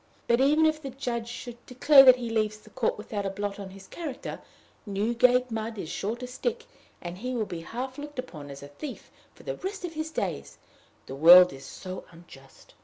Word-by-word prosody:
Even 275 +6 +4
if 310 0 +1
the 275 - -5
judge 245 -3 -4
should 240 0 -8
declare 270 +3 +7
that 255 -2 +9
he 240 -2 -5
leaves 215 -1 0
the 215 0 -19
court 250 -4 -1
without 210 -1 -4
a 195 - -1
blot 205 +1 -4
on 195 -1 -7
his 195 0 -13
character, 290 - -7 0.4
Newgate 240 +4 +2
mud 225 0 -4
is 165 - -5
sure 210 +6 -3
to 250 +1 -7
stick, 460 - -3 0.4
and 175 +1 -6
he 250 +3 -3
will 225 -3 0
be 170 -4 -6
half 255 - -6
looked 295 -1 -9
upon 155 - -7
as 140 0 -9
a - - -8
thief 260 - -9 0.2
for - - -16
the - - -4
rest 385 0 -5
of 340 - -6
his 315 0 -4
days: - - -4 0.5
the - - -8
world 175 +4 +8
is 135 0 -11
so 185 +5 -8
unjust. 150 -6 -17
235 Hz, 205 wpm, -27 LUFS, 195-265 Hz, 0.5 s, that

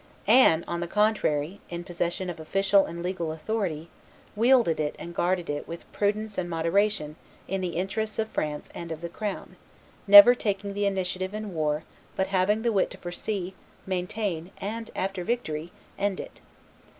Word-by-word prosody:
Anne, 205 -7 +5
on 170 - -2
the 175 - -3
contrary, 200 -5 +1
in 170 0 -5
possession 175 +1 -3
of 175 -2 -5
official 195 +4 +3
and 170 +1 -6
legal 175 -3 -2
authority, 165 -1 -3 0.5
wielded 235 -7 +4
it 150 -1 -1
and 170 - -8
guarded 175 0 0
it 145 0 -4
with 170 +1 -8
prudence 210 0 -1
and 175 -1 -3
moderation 165 -1 0 0.3
in 195 0 -2
the 180 -2 -3
interests 210 +4 -2
of 220 - 0
France 150 -1 -3
and 170 -1 -7
of 160 0 -5
the 170 - -4
crown, 205 +3 -5 0.5
never 205 +4 +11
taking 200 -4 -2
the 205 0 0
initiative 185 0 -2
in 215 -2 -5
war, 150 -1 0 0.3
but 190 - +1
having 205 +4 +2
the 235 - +2
wit 195 - +2
to - - -10
foresee, 185 +1 -4 0.3
maintain, 185 -2 -2
and, 225 +3 -5
after 190 -1 -2
victory, 175 -7 -3 0.3
end 200 -1 0
it. - - -9
185 Hz, 165 wpm, -27 LUFS, 170-205 Hz, 0.5 s, never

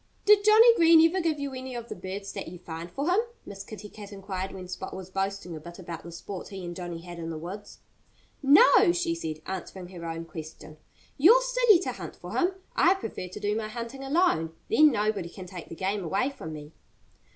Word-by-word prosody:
"Did 415 -1 +6
Johnnie 445 +3 +7
Green 330 -1 +7
ever 370 +3 -1
give 320 -3 0
you 280 -1 -4
any 260 -1 -6
of 235 -1 -6
the - - -6
birds 190 +3 -6
that - - -5
you 180 +2 -8
find 165 -1 -7
for 280 - -3
him?" 365 +3 +4 0.3
Miss 195 -1 -8
Kitty 210 0 -9
Cat 205 -1 -11
inquired 195 -1 -5
when 185 -1 -8
Spot 185 +1 -6
was 190 -1 -8
boasting 195 -2 -3
a - - -6
bit 170 +3 -11
about 170 -3 -7
the 170 - -10
sport 180 +2 -7
he 190 -2 -7
and 175 0 -6
Johnnie 175 -2 -6
had 175 0 -9
in 165 0 -5
the 160 - -4
woods. 185 +6 -8 0.6
"No!" 345 - +7
she 350 -1 0
said, 155 - -5
answering 185 -1 -6
her 175 -2 -9
own 165 0 -5
question. 155 -1 -10 0.4
"You're 425 - +7
silly - - +5
to - - -2
hunt - - -8
for - - -8
him. 370 +1 +2 0.2
I 370 - +5
prefer 285 - -6
to 180 - -8
do 205 +1 0
my 220 -1 -2
hunting 235 +4 -6
alone. 270 - +1 0.2
Then 305 0 +7
nobody 210 -5 -1
can 185 +1 -10
take 180 -2 -9
the - - -7
game 195 +3 -2
away 195 - 0
from 160 -13 -8
me." 150 0 -9
195 Hz, 220 wpm, -27 LUFS, 175-285 Hz, 0.6 s, Johnnie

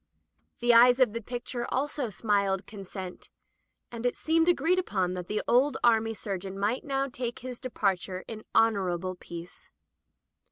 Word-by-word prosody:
The 240 0 +5
eyes 245 +2 +7
of 250 -5 +4
the 230 - -3
picture 240 +1 -5
also 275 -2 -1
smiled 200 -2 0
consent, 190 -3 -8 0.6
and 235 -1 -6
it 245 - 0
seemed 325 +1 +2
agreed 355 +1 +3
upon 190 - -1
that 180 -1 -5
the 210 - -1
old 265 +3 +3
army 225 -1 +3
surgeon 195 -2 -5
might 210 +6 0
now 275 -1 -1
take 245 -2 -4
his 250 -2 -6
departure 195 -7 -2
in 220 -1 -7
honorable 185 -5 +2
peace. 170 -1 -10
225 Hz, 150 wpm, -28 LUFS, 195-250 Hz, 0.6 s, eyes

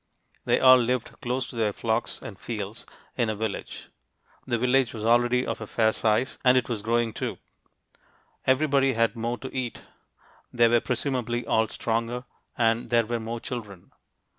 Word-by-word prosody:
They - - +3
all 130 0 +8
lived 125 0 -1
close 125 +1 -2
to - - -11
their 110 -2 +1
flocks 115 +2 -2
and 100 -3 -9
fields, 105 -1 -6 0.3
in 120 -3 +1
a 110 - -1
village. 110 -1 -5 0.6
The 120 - +1
village 125 0 +2
was 110 -1 -5
already 120 +2 +3
of - - -4
a 110 - -5
fair 110 0 +2
size, 115 +4 0
and 130 0 +5
it 130 - +1
was 115 -4 -2
growing, 115 +1 0
too. - - -4 1.1
Everybody 135 0 +3
had 115 +1 +1
more 115 +1 -2
to 130 - -8
eat; 125 -2 -3 0.7
they 120 -1 +4
were 120 0 +3
presumably 125 -2 -2
all 110 0 +2
stronger, 115 +3 -2 0.3
and 115 0 +1
there 115 -1 +3
were 120 +1 -2
more 115 +1 -4
children. 105 -7 -8
120 Hz, 165 wpm, -26 LUFS, 110-125 Hz, 1.1 s, all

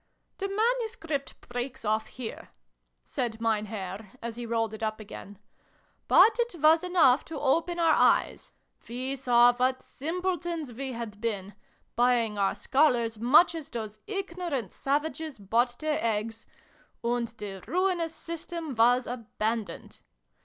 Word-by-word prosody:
" - - -48
The 390 - -2
manuscript 435 - -1
breaks 245 +1 -5
off 215 +1 +1
here," 245 -3 -7 0.5
said 225 - -3
Mein 220 -2 +1
Herr, 195 -1 -6
as 230 -1 -5
he 240 0 -6
rolled 225 -1 0
it 220 - -8
up 215 0 -2
again; 205 -1 -10 0.7
"but 455 - +6
it 475 -5 0
was 315 +3 +5
enough 325 -8 +4
to 325 - -6
open 335 +5 +1
our 330 -1 +5
eyes. - - +2 0.4
We 255 +3 -3
saw 245 -2 +5
what 255 +1 0
simpletons 340 -2 -3
we 265 +2 -4
had 225 -3 -7
been 205 -4 -3 0.4
buying 240 -3 +3
our 195 -1 +2
Scholars 245 -6 +2
much 290 +10 +6
as 320 -3 -6
those 215 -2 -6
ignorant 355 - -3
savages 300 +1 -2
bought 235 +5 +1
their 310 -1 -1
eggs 225 0 -2 0.6
and 235 0 0
the 205 -4 -8
ruinous 355 -2 0
system 335 -2 -5
was 245 +2 +4
abandoned. 225 -2 -4
245 Hz, 140 wpm, -28 LUFS, 225-320 Hz, 0.7 s, but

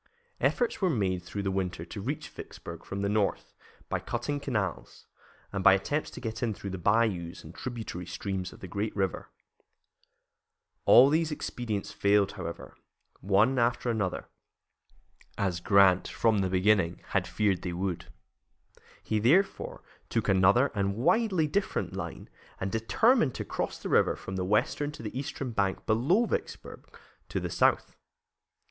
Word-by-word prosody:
Efforts 480 - +1
were 185 - +3
made 95 - 0
through 100 +3 -5
the 95 - 0
winter 90 -3 -2
to 100 +4 -7
reach 140 +8 -3
Vicksburg - - -9
from 100 0 -4
the - - +1
north 105 -1 0 0.3
by - - -1
cutting 145 -1 -3
canals, 105 -10 -3 0.5
and 100 -1 -2
by - - +8
attempts 145 +11 -1
to - - -9
get 115 -2 -5
in 110 -4 0
through 100 - -6
the 95 - -5
bayous 100 -3 +1
and 80 - -11
tributary 110 -8 -6
streams 95 +1 -4
of - - -15
the 95 - -7
great 100 +4 -3
river. 95 -4 -2 1.6
All 125 +3 +8
these 160 +1 +1
expedients 115 -8 -4
failed, 100 -1 +2
however, 85 -4 -7 0.4
one 105 +7 +3
after 120 +1 +1
another, 100 -5 -2 1.1
as 90 -3 0
Grant, 95 0 +4
from 110 -3 +1
the 95 -1 0
beginning, 95 -2 +2
had - - 0
feared 105 -3 +1
that - - -18
they 90 - -4
would. 90 -1 -3 1.0
He, 110 - 0
therefore, 165 - +2 0.3
took - - -1
another 100 +8 +4
and 100 -2 0
widely 185 - +2
different 195 +7 -1
line, - - -6 0.3
and 95 0 -2
determined 140 - +3
to - - -4
cross - - -3
the - - -6
river - - +3
from 95 - -7
the 95 -1 -1
western 105 +8 +1
to 115 - -10
the 110 - -6
eastern 135 -1 -4
bank 100 -4 -1
below 140 - +3
Vicksburg, - - -5 0.4
to - - -1
the - - -4
south. - - +2
105 Hz, 155 wpm, -29 LUFS, 95-125 Hz, 1.6 s, by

